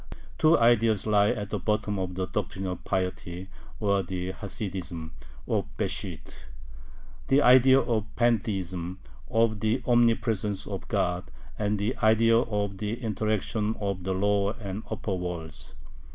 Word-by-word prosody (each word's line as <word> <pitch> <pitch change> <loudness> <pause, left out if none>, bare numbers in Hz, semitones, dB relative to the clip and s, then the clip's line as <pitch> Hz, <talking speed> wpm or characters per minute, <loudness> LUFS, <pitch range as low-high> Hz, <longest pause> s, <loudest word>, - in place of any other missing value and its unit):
Two 155 +2 +6
ideas 115 -3 +3
lie 105 -1 +4
at 105 -3 -3
the 105 - -1
bottom 105 +1 -1
of 90 -1 -3
the 95 0 -1
"Doctrine 95 0 -3
of 90 -2 -4
Piety," 90 -1 -3 0.3
or 100 -2 +2
the 90 0 -4
Hasidism, 95 -5 -5 0.4
of - - 0
Besht: - - -4 0.8
the 140 +2 +4
idea 130 +2 +7
of 115 -5 0
Pantheism, 95 -7 0 0.3
of 115 -1 +2
the 110 +4 0
Omnipresence 115 -4 +2
of - - -6
God, 90 0 -1 0.3
and 105 0 0
the 105 +5 -1
idea 115 +1 +4
of 105 -4 -2
the 105 0 -2
interaction 110 -1 -1
of 100 -3 -2
the 95 +1 -1
lower 100 +1 +1
and 100 -1 -5
upper 105 -2 -3
worlds. 85 -3 -6
105 Hz, 135 wpm, -27 LUFS, 95-110 Hz, 0.8 s, idea